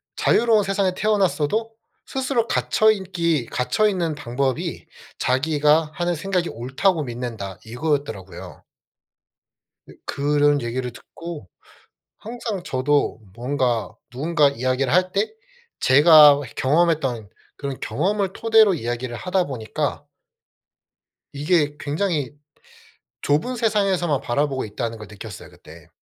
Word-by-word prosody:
자유로운 225 -3 +3
세상에 195 -1 0
태어났어도 210 0 0 0.3
스스로 260 -3 -1
갇혀 220 0 +3
인기 170 - -1
갇혀 210 +12 +1
있는 170 -6 -1
방법이 130 -1 -3 0.3
'자기가 150 +3 +2
하는 175 0 -1
생각이 180 +1 -1
옳다고 145 - 0
믿는다.' 115 -6 -6
이거였더라고요. 125 - -4 1.3
으 - - -12
그런 145 0 +2
얘기를 125 +1 -3
듣고 160 - -10 0.7
항상 225 -4 -5
저도 135 -2 0 0.2
뭔가 125 -2 -1 0.2
누군가 145 +3 +2
이야기를 130 0 -1
할 185 0 +3
때 200 +2 0 0.5
제가 145 +1 +7
해 120 - -10
경험했던 135 - +1 0.3
그런 140 -2 -5
경험을 195 +4 -1
토대로 220 -3 +4
이야기를 120 -3 -4
하다 180 +2 0
보니까 115 -5 -4 1.3
이게 150 0 +1
굉장히 150 -2 -2 0.9
좁은 155 - 0
세상에서만 195 - +1
바라보고 135 +1 -1
있다는 115 +2 -4
걸 110 -2 -10
느꼈어요 105 - -10
그때. - - -16
150 Hz, 275 characters per minute, -22 LUFS, 130-185 Hz, 1.3 s, 제가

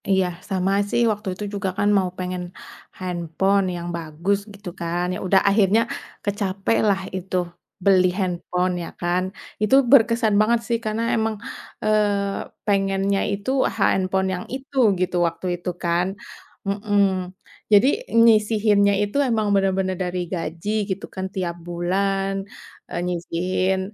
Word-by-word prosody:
Iya. 190 -1 +3 0.2
Sama 190 0 0 0.2
sih, 235 - +1
waktu 210 -1 -5
itu 210 - -5
juga 200 -1 -1
kan, 205 +1 +2
mau 185 -2 +1
pengen 180 -1 -3 0.5
handphone 185 +2 0
yang 175 0 -5
bagus, 170 +5 -1 0.2
gitu 200 -1 -8
kan. 170 +1 -1
Ya - - -4
udah 190 +1 +5
akhirnya, 200 +1 +4 0.4
kecapai 200 +1 -1
lah 195 -2 +2
itu, 185 0 -4 0.5
beli 185 -1 +5
handphone, 180 -1 -1
ya - - -6
kan. 175 +1 +1 0.4
Itu 215 +5 +4 0.2
berkesan 230 -4 +5
banget, 235 +2 +3
sih. 235 - +1
Karena 215 +1 -1
emang, 220 -1 0 0.5
eee 205 -2 +1 0.2
pengennya, 195 -1 +1
itu, 200 +5 -3 0.3
handphone 190 -1 +2
yang 180 - -4
itu, 270 +1 -9 0.2
gitu, 180 0 0
waktu 165 +2 -6 0.2
itu, 180 - -3
kan, 170 +1 +1 0.6
mhm. 205 +1 +1 0.7
Jadi, 210 +5 +7 0.4
nyisihinnya 210 -2 +4
itu 205 +6 -3
emang 220 -2 +1
bener-bener 190 -1 +1
dari 180 0 -3
gaji, 165 +2 -4 0.2
gitu 190 0 -3
kan 190 -1 -3
tiap 180 -3 -2
bulan, 195 +3 0 0.6
eee, - - -3
nyisihin. 180 +2 -1
195 Hz, 135 wpm, -23 LUFS, 180-205 Hz, 0.7 s, Jadi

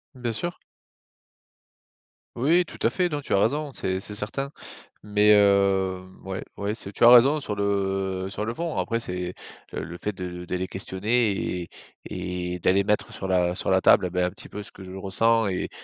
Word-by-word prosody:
Bien 125 -2 -3
sûr. 175 +11 -4 1.8
Oui, 165 +9 +3
tout - - -12
à - - +4
fait. 180 -1 0
Non, 150 -2 -3
tu - - -10
as - - +5
raison, 145 +8 0
c'est 95 -5 -2
c'est 105 +2 -7
certain, 120 +7 -3 0.5
mais 105 0 +4
heu, 100 -2 +3 0.2
ouais 95 0 -5
ouais 100 +1 -2
c'est 100 -3 -7
tu 100 - -2
as - - +10
raison 130 +5 +7
sur 110 -7 -4
le 95 -2 -1
sur 105 - -3
le 115 - -2
fond. 165 -1 -3
Après, 115 -1 0
c'est 90 -4 -4 0.4
le - - -4
le 85 +1 -7
fait 105 - -1
de 90 -1 -6
de 90 - -3
les 90 0 -1
questionner 105 +5 0 0.3
et - - -12 0.4
et 90 -1 -4
et - - -7
d'aller 95 +3 +3
mettre 105 +1 0
sur 95 - -5
la 90 -2 +2
sur - - -2
la 95 0 +4
table, 90 - +5
et - - -6
bah, 90 0 +1
un 90 - -1
petit - - -11
peu 105 - -6
ce - - -12
que 95 - -12
je 95 0 -9
ressens 115 +4 +2
et 95 -2 -2
100 Hz, 210 wpm, -25 LUFS, 95-115 Hz, 1.8 s, as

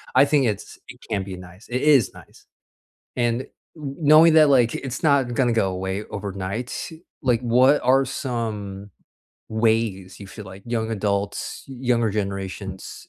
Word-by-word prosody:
I - - +7
think 145 -2 +2
it's 105 -3 -4
it - - -12
can 100 -2 -1
be 95 -1 -7
nice. 90 +3 -13
It 125 +1 -1
is 145 -8 +4
nice, - - -17 0.7
and, 120 0 +1
kn - - -15 0.6
knowing 160 +2 +8
that, 155 -2 +7
like, 125 -4 +4
it's 130 -2 -5
not 140 -5 +3
gonna 120 -1 +2
go 110 -4 +1
away 95 +2 -3
overnight, 100 +5 -5 0.3
like, 125 -4 +2
what 125 +4 +4
are 135 +2 +4
some 110 -7 -4 0.6
ways 110 -4 0
you 100 - -8
feel 110 +2 -10
like 95 0 -11
young 115 -1 -2
adults, 100 -1 -2
younger 125 -3 0
generations, 95 -1 -5
115 Hz, 150 wpm, -23 LUFS, 100-125 Hz, 0.7 s, knowing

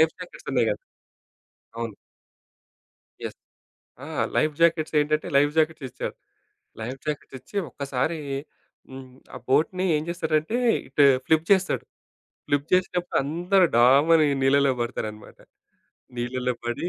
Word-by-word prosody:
Life jackets 160 +3 -1
ఉన్నాయి - - +2
కదా! - - -4 1.0
అవును. 115 -2 -4 1.3
యెస్. - - -6 0.7
ఆ! - - -9 0.3
లైఫ్‌జాకెట్స్ 160 +1 +2
ఏంటంటే 150 +1 0
లైఫ్‌జాకెట్స్ 155 +1 +2
ఇచ్చాడు. - - -5 0.7
లైఫ్‌జాకెట్స్ 135 +4 -5
ఇచ్చి 130 +11 -8
ఒక్కసారి 140 +5 -2 0.7
హ్మ్. 130 0 -9 0.3
ఆ - - -5
బోట్‌ని 175 +7 +2
ఏం 150 - -3
జేసారంటే 160 +4 0 0.3
ఇటు 145 - +4 0.2
ఫ్లిప్ 160 0 +2
చేసాడు. 190 -1 +2 0.6
ప్లిప్ 145 0 0
చేసినప్పుడు 180 -1 +1
అందరూ 180 +6 +2
ఢామని 145 +6 +5
నీళ్ళలో 140 +1 +4
పడతారనమాట. 110 -3 -5 0.8
నీళ్ళలో 125 +1 -2
పడి 120 +8 -2
150 Hz, 105 wpm, -25 LUFS, 130-165 Hz, 1.3 s, ఢామని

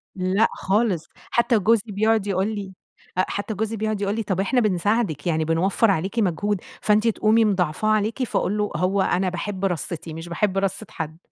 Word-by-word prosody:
لأ 190 +4 +2
خالص. 195 -4 0 0.2
حتّى 235 -2 +3
جوزي 220 +1 +2
بيقعد 215 0 +1
يقول 190 +1 +1
لي 195 -2 -6 0.4
أ 185 - +3
حتّى 205 +2 -3
جوزي 220 +2 -2
بيقعد 215 -1 -2
يقول 200 +1 0
لي: 225 - -2
"طيب 190 -2 -2
إحنا 245 +6 +2
بنساعدِك، 200 - 0
يعني 160 -1 +1
بنوفّر 190 +6 +2
عليكِ 195 +6 -1
مجهود، 200 +1 0 0.2
فأنتِ 215 +2 +3
تقومي 220 0 +3
مضاعفاه 190 0 0
عليكِ."، 215 +4 +1
فأقول 210 -3 -1
له: 210 0 -1
"هو 190 +2 +1
أنا 185 0 +1
باحب 190 +2 -3
رصِّتي 170 -2 -3
مش 165 +2 -7
باحب 190 +2 0
رصّة 195 +2 -1
حد." 160 -1 -6
200 Hz, 180 wpm, -23 LUFS, 185-215 Hz, 0.4 s, حتّى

